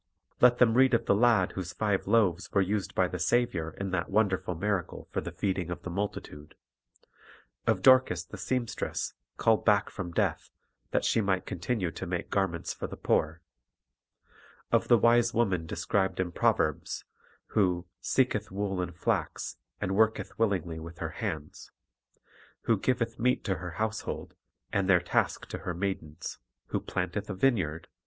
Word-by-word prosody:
Let 125 Hz, 0 st, +7 dB
them 120 Hz, -3 st, +5 dB
read 130 Hz, 0 st, +5 dB
of 115 Hz, -, 0 dB
the -, -, +4 dB
lad 115 Hz, +2 st, +4 dB
whose 95 Hz, -2 st, -5 dB
five 105 Hz, 0 st, 0 dB
loaves 95 Hz, -6 st, +2 dB
were 100 Hz, -, +3 dB
used 100 Hz, +1 st, -2 dB
by 95 Hz, -, +3 dB
the 90 Hz, -, -5 dB
Saviour 90 Hz, -5 st, +1 dB
in 100 Hz, -1 st, -3 dB
that 90 Hz, -2 st, -1 dB
wonderful 95 Hz, -3 st, +1 dB
miracle 95 Hz, 0 st, -2 dB
for -, -, -1 dB
the -, -, -5 dB
feeding 95 Hz, -3 st, -2 dB
of 85 Hz, -, -5 dB
the 90 Hz, -, -5 dB
multitude; 85 Hz, -6 st, -5 dB, 1.1 s
of -, -, +2 dB
Dorcas 130 Hz, -10 st, +6 dB
the -, -, -10 dB
seam 125 Hz, -2 st, -1 dB
stress, -, -, -3 dB, 0.2 s
called 115 Hz, -2 st, +3 dB
back 105 Hz, -1 st, +3 dB
from 90 Hz, -4 st, -5 dB
death, -, -, 0 dB, 0.4 s
that -, -, 0 dB
she 115 Hz, -, +3 dB
might 95 Hz, -2 st, 0 dB
continue 90 Hz, 0 st, -2 dB
to -, -, -6 dB
make -, -, -3 dB
garments 95 Hz, -4 st, 0 dB
for -, -, -5 dB
the -, -, -8 dB
poor; 80 Hz, +2 st, 0 dB, 1.3 s
of -, -, +3 dB
the 120 Hz, -, +6 dB
wise 120 Hz, +1 st, +4 dB
woman 95 Hz, -8 st, +1 dB
de -, -, -4 dB
scribed 95 Hz, -2 st, 0 dB
in 90 Hz, -1 st, 0 dB
the -, -, -14 dB
Proverbs, 75 Hz, -2 st, 0 dB, 0.4 s
who 90 Hz, -4 st, +1 dB
"seeketh 110 Hz, -5 st, +1 dB
wool 95 Hz, -1 st, -2 dB
and 90 Hz, -1 st, -4 dB
flax, -, -, -2 dB, 0.2 s
and 95 Hz, -, -1 dB
worketh 110 Hz, +1 st, +2 dB
willingly 90 Hz, -7 st, 0 dB
with 85 Hz, +1 st, -9 dB
her 80 Hz, -2 st, -4 dB
hands;" 80 Hz, -9 st, -5 dB, 0.9 s
who 115 Hz, -, +2 dB
"giveth 115 Hz, +2 st, -1 dB
meat 125 Hz, +2 st, +2 dB
to 95 Hz, -2 st, -1 dB
her 90 Hz, 0 st, -6 dB
household, 110 Hz, 0 st, -3 dB, 0.4 s
and 100 Hz, -1 st, +1 dB
their 90 Hz, -2 st, +7 dB
task 90 Hz, -, 0 dB
to -, -, -5 dB
her 90 Hz, -, -4 dB
maidens;" 85 Hz, -4 st, -4 dB, 0.3 s
who -, -, 0 dB
"planteth 95 Hz, +3 st, -3 dB
a 100 Hz, -, -3 dB
vineyard 95 Hz, -, +1 dB
95 Hz, 170 wpm, -29 LUFS, 90-110 Hz, 1.3 s, Let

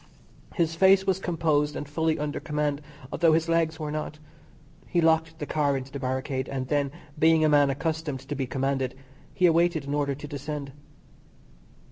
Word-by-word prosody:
His 165 Hz, -3 st, +1 dB
face 190 Hz, +3 st, +5 dB
was 190 Hz, -1 st, +1 dB
composed 155 Hz, -5 st, 0 dB
and 145 Hz, -, -5 dB
fully 160 Hz, +2 st, 0 dB
under 150 Hz, 0 st, -3 dB
command, 150 Hz, -1 st, -2 dB, 0.3 s
although 165 Hz, -2 st, +3 dB
his 165 Hz, +1 st, +2 dB
legs 165 Hz, -1 st, +1 dB
were 150 Hz, -1 st, -3 dB
not. 155 Hz, 0 st, -4 dB, 0.7 s
He 175 Hz, -, +1 dB
locked 160 Hz, 0 st, +2 dB
the 150 Hz, -, -4 dB
car 145 Hz, -2 st, +1 dB
into 130 Hz, 0 st, -7 dB
the 140 Hz, -, -5 dB
barricade, 130 Hz, 0 st, -2 dB
and 130 Hz, -2 st, -3 dB
then, 145 Hz, -2 st, +1 dB, 0.3 s
being 160 Hz, 0 st, +5 dB
a -, -, +4 dB
man 145 Hz, -1 st, +5 dB
accustomed 150 Hz, -1 st, -2 dB
to 135 Hz, +2 st, -6 dB
be 135 Hz, -2 st, -2 dB
commanded, 135 Hz, -1 st, -1 dB, 0.4 s
he 180 Hz, -, +2 dB
awaited 170 Hz, -2 st, +3 dB
an 140 Hz, -, -2 dB
order 145 Hz, -1 st, 0 dB
to 145 Hz, +2 st, -8 dB
descend. 145 Hz, -1 st, -5 dB
150 Hz, 175 wpm, -26 LUFS, 140-160 Hz, 0.7 s, face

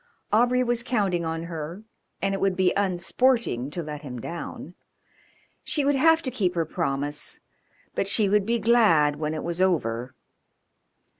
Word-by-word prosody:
Aubrey 245 Hz, +3 st, +4 dB
was 240 Hz, -1 st, 0 dB
counting 200 Hz, -8 st, 0 dB
on 160 Hz, 0 st, -3 dB
her, 170 Hz, +3 st, -6 dB, 0.4 s
and 195 Hz, 0 st, +1 dB
it 195 Hz, -, -3 dB
would 195 Hz, -1 st, +2 dB
be 185 Hz, -1 st, +2 dB
unsporting 195 Hz, -, +1 dB
to 170 Hz, +3 st, -5 dB
let 150 Hz, -1 st, -6 dB
him 125 Hz, -4 st, -7 dB
down; 170 Hz, +4 st, -7 dB, 0.9 s
she 290 Hz, -3 st, -1 dB
would 285 Hz, -, +3 dB
have 325 Hz, +4 st, +4 dB
to 260 Hz, -, -2 dB
keep 185 Hz, -7 st, 0 dB
her 165 Hz, -1 st, +1 dB
promise, 145 Hz, -3 st, -3 dB, 0.5 s
but 195 Hz, -, -1 dB
she 205 Hz, +1 st, +3 dB
would 205 Hz, 0 st, +2 dB
be 235 Hz, +1 st, +2 dB
glad 205 Hz, -11 st, +4 dB
when 155 Hz, +1 st, -2 dB
it 155 Hz, -, -4 dB
was 170 Hz, +1 st, -2 dB
over. 125 Hz, -10 st, 0 dB
185 Hz, 160 wpm, -25 LUFS, 155-230 Hz, 0.9 s, Aubrey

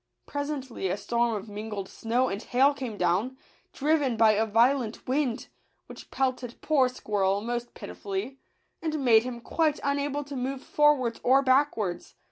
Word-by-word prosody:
Presently 285 Hz, -7 st, -4 dB
a 185 Hz, +2 st, -1 dB
storm 235 Hz, +1 st, 0 dB
of 205 Hz, +1 st, -6 dB
mingled 210 Hz, -1 st, -6 dB
snow 240 Hz, +3 st, 0 dB
and 200 Hz, -1 st, -4 dB
hail 265 Hz, +4 st, +3 dB
came 255 Hz, -6 st, -6 dB
down, 190 Hz, +9 st, 0 dB, 0.3 s
driven 290 Hz, -4 st, +1 dB
by 220 Hz, -1 st, +6 dB
a 215 Hz, +1 st, +1 dB
violent 235 Hz, +1 st, +2 dB
wind, 255 Hz, -3 st, 0 dB, 0.4 s
which -, -, -12 dB
pelted 255 Hz, -2 st, -2 dB
poor 275 Hz, -5 st, +2 dB
Squirrel 200 Hz, -5 st, 0 dB
most 240 Hz, +2 st, -4 dB
piti -, -, -8 dB
fully, 205 Hz, +7 st, -5 dB, 0.4 s
and 310 Hz, -4 st, -2 dB
made 225 Hz, -2 st, +6 dB
him 240 Hz, 0 st, -6 dB
quite 305 Hz, +5 st, 0 dB
unable 285 Hz, +1 st, -1 dB
to 285 Hz, 0 st, -8 dB
move 260 Hz, +1 st, -3 dB
forwards 290 Hz, -6 st, +2 dB
or 270 Hz, +2 st, +4 dB
backwards. 255 Hz, -10 st, +1 dB
250 Hz, 155 wpm, -27 LUFS, 220-275 Hz, 0.4 s, by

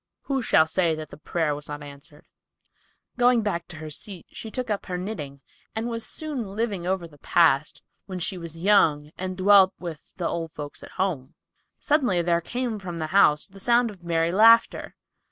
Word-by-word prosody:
Who 270 Hz, -2 st, -2 dB
shall 160 Hz, -8 st, +4 dB
say 165 Hz, 0 st, +1 dB
that 155 Hz, -1 st, -8 dB
the -, -, -10 dB
prayer 155 Hz, 0 st, -1 dB
was 145 Hz, +1 st, -7 dB
not 145 Hz, 0 st, -6 dB
answered? 145 Hz, +1 st, -13 dB, 0.9 s
Going 245 Hz, -2 st, +4 dB
back 170 Hz, -5 st, -2 dB
to 175 Hz, -, -10 dB
her 155 Hz, 0 st, -8 dB
seat, 180 Hz, +3 st, -7 dB
she 220 Hz, -, -8 dB
took 250 Hz, 0 st, -3 dB
up 205 Hz, -, -3 dB
her 180 Hz, -, -3 dB
knitting 150 Hz, -8 st, -6 dB, 0.3 s
and 225 Hz, +1 st, -2 dB
was 230 Hz, -1 st, -3 dB
soon 300 Hz, -3 st, -3 dB
living 205 Hz, -6 st, -2 dB
over 185 Hz, -2 st, -1 dB
the 145 Hz, -3 st, -19 dB
past, 150 Hz, -3 st, +2 dB, 0.2 s
when 185 Hz, -2 st, -5 dB
she 180 Hz, +2 st, -1 dB
was 170 Hz, -1 st, -8 dB
young 155 Hz, -7 st, +3 dB
and 185 Hz, 0 st, -5 dB
dwelt 190 Hz, 0 st, +6 dB
with 170 Hz, -4 st, -8 dB
"the 175 Hz, -3 st, -1 dB
old 165 Hz, -2 st, -4 dB
folks 145 Hz, -1 st, -8 dB
at -, -, -12 dB
home." 160 Hz, -9 st, -2 dB, 0.4 s
Suddenly 250 Hz, -, +1 dB
there 170 Hz, 0 st, +2 dB
came 240 Hz, +3 st, -3 dB
from 175 Hz, -3 st, -6 dB
the 160 Hz, -1 st, -3 dB
house 150 Hz, -6 st, +5 dB
the 195 Hz, -1 st, -13 dB
sound 235 Hz, +2 st, +3 dB
of 185 Hz, -4 st, -16 dB
merry 165 Hz, -1 st, +1 dB
laughter. 225 Hz, +4 st, +4 dB
180 Hz, 190 wpm, -25 LUFS, 160-210 Hz, 0.9 s, dwelt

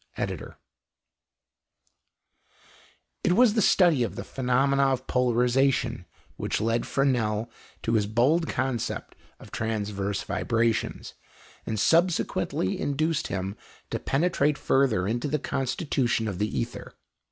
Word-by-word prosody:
ED.] -, -, -4 dB, 2.7 s
It 180 Hz, -, +3 dB
was 235 Hz, +1 st, +5 dB
the 220 Hz, -, +2 dB
study 175 Hz, -8 st, +4 dB
of 120 Hz, -, -1 dB
the -, -, -5 dB
phenomena 135 Hz, +2 st, +1 dB
of 130 Hz, -1 st, -1 dB
polarization 125 Hz, -3 st, +1 dB, 0.3 s
which -, -, -2 dB
led 115 Hz, +2 st, 0 dB
Fresnel 120 Hz, -5 st, 0 dB, 0.3 s
to 115 Hz, -, 0 dB
his 105 Hz, -3 st, +2 dB
bold 135 Hz, +10 st, +2 dB
conception 130 Hz, -2 st, -3 dB, 0.2 s
of -, -, -14 dB
transverse 105 Hz, -3 st, -2 dB
vibrations, 115 Hz, -1 st, -1 dB, 0.5 s
and 110 Hz, -1 st, -2 dB
subsequently 165 Hz, -, +1 dB
induced 155 Hz, +2 st, 0 dB
him 95 Hz, +1 st, -3 dB, 0.4 s
to -, -, -1 dB
penetrate 150 Hz, -1 st, +1 dB
further 120 Hz, -9 st, +2 dB
into 120 Hz, +6 st, -1 dB
the 150 Hz, +2 st, 0 dB
constitution 130 Hz, -4 st, -1 dB
of 95 Hz, -3 st, -4 dB
the 105 Hz, -, +1 dB
ether. 65 Hz, -, -5 dB
125 Hz, 115 wpm, -26 LUFS, 110-140 Hz, 2.7 s, was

